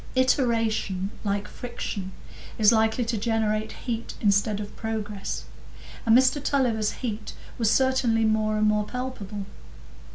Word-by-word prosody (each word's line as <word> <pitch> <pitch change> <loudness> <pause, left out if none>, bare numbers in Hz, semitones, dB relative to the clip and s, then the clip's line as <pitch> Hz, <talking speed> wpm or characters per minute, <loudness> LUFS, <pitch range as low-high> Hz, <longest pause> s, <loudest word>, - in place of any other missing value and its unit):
Iteration, 225 -7 +1
like 205 0 -1
friction, 200 -5 -5 0.5
is 215 -1 +6
likely 220 +1 +2
to 225 -1 -1
generate 220 -1 0
heat 235 -2 -3
instead 205 0 +2
of 205 -1 -7
progress, 210 -3 -4 0.6
and 225 +1 +7
Mr 260 +2 +3
Tulliver's 235 -8 +1
heat 220 -2 -4 0.3
was 225 -2 +3
certainly 250 -2 +3
more 215 0 +2
and 215 - +2
more 210 0 +2
palpable. 215 -5 -5
220 Hz, 125 wpm, -26 LUFS, 210-240 Hz, 0.6 s, and